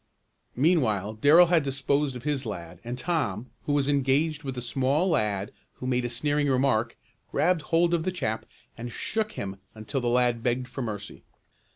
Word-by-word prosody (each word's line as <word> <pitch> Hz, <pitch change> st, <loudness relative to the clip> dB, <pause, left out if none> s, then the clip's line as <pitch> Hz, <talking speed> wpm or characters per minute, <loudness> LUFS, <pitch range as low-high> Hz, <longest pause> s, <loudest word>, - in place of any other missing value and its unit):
Meanwhile 120 Hz, -, +2 dB
Darrell 145 Hz, +10 st, +6 dB
had 170 Hz, -1 st, +3 dB
disposed 140 Hz, 0 st, 0 dB
of 125 Hz, -, -8 dB
his 145 Hz, -2 st, -1 dB
lad, 85 Hz, -6 st, -7 dB
and 120 Hz, +1 st, -5 dB
Tom, 130 Hz, -, -2 dB
who 145 Hz, -, 0 dB
was 140 Hz, -1 st, +2 dB
engaged 145 Hz, +2 st, +1 dB
with 135 Hz, -4 st, -5 dB
a -, -, -3 dB
small 135 Hz, +7 st, +1 dB
lad 105 Hz, -8 st, 0 dB, 0.2 s
who -, -, -9 dB
made 125 Hz, -1 st, 0 dB
a -, -, -1 dB
sneering 145 Hz, +4 st, 0 dB
remark, 130 Hz, -4 st, +1 dB, 0.3 s
grabbed 175 Hz, 0 st, +2 dB
hold 170 Hz, +2 st, +2 dB
of 170 Hz, -, +2 dB
the 185 Hz, +3 st, -1 dB
chap 110 Hz, -11 st, -3 dB, 0.3 s
and 120 Hz, +1 st, -6 dB
shook 215 Hz, -, -2 dB
him 95 Hz, -, -5 dB, 0.2 s
until 110 Hz, +5 st, -3 dB
the 120 Hz, -, -1 dB
lad 120 Hz, -1 st, +2 dB
begged 125 Hz, +1 st, 0 dB
for 130 Hz, +2 st, -6 dB
mercy. 105 Hz, -3 st, -6 dB
130 Hz, 180 wpm, -27 LUFS, 115-150 Hz, 0.3 s, Darrell